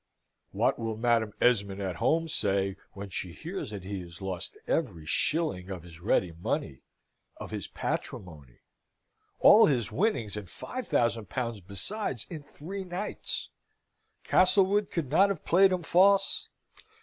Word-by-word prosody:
What - - +1
will 115 -1 -3
Madam 115 -2 +2
Esmond 100 -5 +2
at 95 -3 -3
home 165 +1 +2
say 100 -8 0 0.2
when 100 -1 -8
she 90 -2 -4
hears 170 - -6
that 100 -3 -7
he 100 +1 -4
has 85 -1 -11
lost 95 -3 -5
every 95 - -1
shilling 95 - 0
of 90 -4 -6
his 85 -2 -13
ready 90 -1 +1
money 80 -4 -3 0.6
of - - -8
his - - -4
patrimony? 75 -9 -5 0.8
All 225 - +8
his 125 -7 0
winnings, 150 - 0
and 105 -4 -7
five 255 - -6
thousand 115 -2 +1
pounds 115 -5 -3
besides, 120 - -3
in 160 -3 -5
three 180 +7 -7
nights. 185 +3 -4 0.7
Castlewood 195 +2 +4
could 150 -7 -3
not 195 +6 +5
have 195 -5 -4
played 190 +3 +5
him 180 -2 -1
false? 195 +4 +3
115 Hz, 145 wpm, -29 LUFS, -, 0.8 s, All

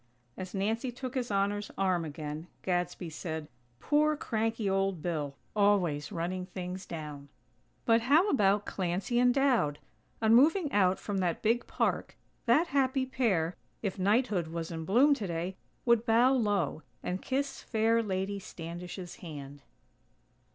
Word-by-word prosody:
As 185 +1 -7
Nancy 225 +6 -1
took 250 +1 -6
His 250 -2 -2
Honor's 205 +1 0
arm 185 -3 +1
again, 150 +1 -6 0.2
Gadsby 175 -1 -1
said: 160 -1 -5 0.3
"Poor, 300 +1 +2
cranky 225 -4 -1
old 195 -4 0
Bill! 150 -5 -2 0.2
Always 185 -8 +2
running 180 +2 -3
things 185 0 -6
down." 150 -3 -7 0.6
But 230 -1 +4
how 295 - +4
about 205 -4 +3
Clancy 195 +7 -1
and 245 0 +5
Dowd? 245 - +2 0.4
On 220 0 +4
moving 300 +5 +5
out 190 -2 +3
from 200 -2 -3
that 175 -3 -1
big 230 +2 +2
park, - - -1 0.3
that 305 +9 +4
happy 265 -1 +2
pair, 200 -11 0 0.3
if 200 -1 -2
Knighthood 205 -3 +2
was 165 0 -4
in 160 -1 -5
bloom 255 - +5
today, 185 -6 -3 0.3
would 235 -2 +4
bow 240 +4 +5
low, 205 - +1 0.2
and 185 +1 -2
kiss 275 +1 -2
fair 225 0 +2
Lady 200 -1 -2
Standish's 175 0 -7
hand. 145 -4 -9
195 Hz, 140 wpm, -30 LUFS, 175-235 Hz, 0.6 s, and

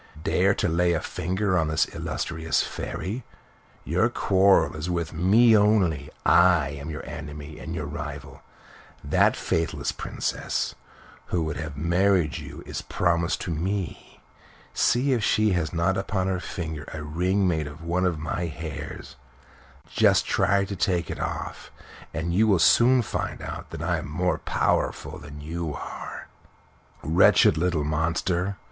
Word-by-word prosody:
"Dare 95 +1 +2
to - - 0
lay 85 +1 +2
a 80 - +1
finger 95 +4 -1
upon 80 -3 +2
this 80 +1 +2
illustrious 80 0 -1
Fairy! 110 +7 -5 0.6
Your - - +2
quarrel 95 -2 +3
is 75 +3 -4
with 85 -2 -2
me 110 +8 +5
only. 100 -9 +3 0.2
I 85 -5 +5
am 70 +2 -7
your 75 -1 -6
enemy 75 -2 -8
and 80 +1 -6
your 80 -3 -3
rival. 70 -2 -7 0.6
That - - +3
faithless 80 -1 -1
Princess - - -3 0.5
who 85 -2 0
would 80 -2 -3
have 75 -4 -6
married 85 0 +2
you - - -9
is - - -5
promised 85 0 0
to 85 - -3
me. 90 +3 -4 0.5
See 130 +3 +2
if 115 -4 0
she 110 +1 +3
has 85 -4 0
not 85 +3 +1
upon 95 -1 -1
her 95 -1 0
finger 80 -5 -5
a 80 -1 -6
ring 90 +6 +1
made 80 -4 0
of 75 +2 -10
one 90 +2 +1
of 85 -3 -1
my 85 +2 -3
hairs. 75 -2 -7 0.7
Just - - +3
try 100 -1 +2
to 100 +1 -5
take 85 -2 0
it - - -6
off, - - -5 0.4
and 85 +2 -2
you 110 +5 +4
will 100 -3 +4
soon 120 +9 +5
find - - -3
out - - -7
that - - -6
I - - 0
am - - -7
more 90 +1 0
powerful - - -1
than 75 0 -10
you 80 0 -4
are!" - - -7 0.8
"Wretched 80 +3 +5
little 85 -2 0
monster!" 85 +5 -1
85 Hz, 155 wpm, -25 LUFS, 80-95 Hz, 0.8 s, me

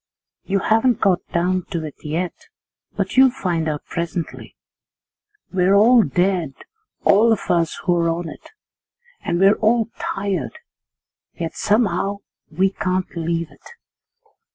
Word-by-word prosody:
You 195 - 0
haven't 225 +2 +2
got 185 -2 +3
down 180 +1 0
to 170 -5 -3
it 150 - -7
yet, 165 +4 -2 0.6
but - - -2
you'll 265 0 +8
find 175 -10 -2
out 150 -1 -4
presently. 170 -1 -5 1.0
'We're 185 +1 +3
all 230 +4 +6
dead, 180 -8 0 0.5
all 220 +4 +5
of 225 - +1
us 170 -2 +1
who're 170 -2 +2
on 165 +1 -2
it, 155 - -11 0.7
and 170 - -1
we're 195 +2 +6
all 225 +1 +2
tired, 195 -8 -3 0.8
yet 165 -1 -4
somehow 205 -2 0 0.3
we 185 +4 +1
can't 185 -1 -2
leave 165 0 -2
it. - - -16
185 Hz, 130 wpm, -21 LUFS, 170-205 Hz, 1.0 s, you'll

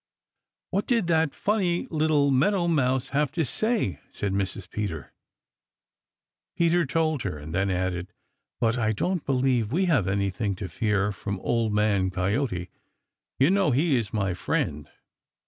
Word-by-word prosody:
"What 200 - -1
did 230 -6 +2
that 160 -3 +3
funny 190 -5 0
little 155 -3 +2
Meadow 175 +7 +2
Mouse 130 -5 +1
have 145 -1 +1
to 165 -2 0
say?" 210 - -1
asked - - -12
Mrs. 100 -1 -1
Peter. 90 -9 -5 1.4
Peter 170 -2 +3
told 155 -1 0
her 90 -6 -3
and 75 +2 -8
then 100 +2 +1
added, 90 -1 -2 0.5
"But 115 +1 +1
I 110 -1 +1
don't 180 - -1
believe 125 -4 +1
we 185 +6 +2
have 140 - +2
anything 100 +1 -1
to 95 0 -5
fear 105 +2 0
from 100 0 -5
Old 115 -2 0
Man 105 -3 +2
Coyote. 95 0 -1 0.7
You 135 +6 +4
know 195 -4 +3
he 145 +3 +2
is 115 -4 -1
my 100 -4 0
friend." 75 -3 -2
120 Hz, 145 wpm, -26 LUFS, 100-160 Hz, 1.4 s, You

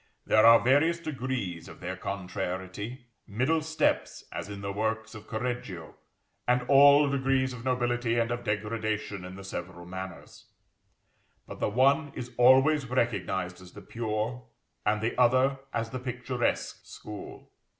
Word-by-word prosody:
There 110 +1 +5
are 115 0 +9
various 145 +7 +3
degrees 125 - -4
of - - -12
their 90 +1 -4
contrariety: 95 +5 -5 0.2
middle 130 +10 +1
steps, 160 0 0
as - - -5
in 100 -1 -7
the 100 0 -3
works 110 +2 -2
of 110 -2 -11
Correggio, 110 -8 -4 0.5
and 125 0 +3
all 140 +2 +7
degrees 135 -1 +1
of 120 -2 -9
nobility 120 -2 0
and 115 0 +1
of 120 0 -3
degradation 105 -1 -2
in 90 0 -8
the 95 - -9
several 90 -2 -7
manners: 95 0 -8 1.0
but - - -9
the - - +1
one 140 +6 +3
is 125 0 -6
always 135 +3 +5
recognised 95 -7 -1
as 90 -1 -14
the 105 - -10
pure, 115 +3 -3 0.4
and 105 0 +2
the 115 +2 -1
other 130 +2 +4
as 115 0 -2
the 130 - -4
picturesque 125 0 -2
school. 105 -1 -10
115 Hz, 145 wpm, -28 LUFS, 100-130 Hz, 1.0 s, are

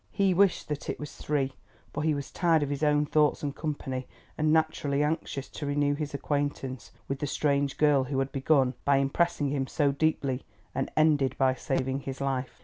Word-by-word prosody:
He 195 -2 +2
wished 195 0 +3
that 150 -1 -4
it - - -3
was 150 - -7
three, 135 -3 -1 0.4
for 145 - -2
he 155 -1 +2
was 140 -1 -5
tired 165 -3 +3
of 145 - -3
his 140 0 -3
own 150 -1 +3
thoughts 150 0 +2
and 140 -1 -2
company, 135 -4 -4 0.3
and 155 0 +1
naturally 155 -3 +1
anxious 150 -3 -2
to 145 - -6
renew 145 0 +2
his 145 -1 -4
acquaintance 140 -3 -3 0.2
with 135 0 -3
the 145 - -2
strange 140 -1 0
girl 145 -3 +4
who 135 +1 -3
had 135 0 0
begun 135 -2 +2
by 140 -1 +4
impressing 145 +2 +1
him 135 -1 -1
so 145 0 +2
deeply 140 -3 0 0.3
and 135 - -2
ended 150 -4 +3
by 130 -1 +3
saving 130 +1 -1
his 135 -1 -6
life. 135 -2 -2
145 Hz, 195 wpm, -28 LUFS, 135-150 Hz, 0.4 s, girl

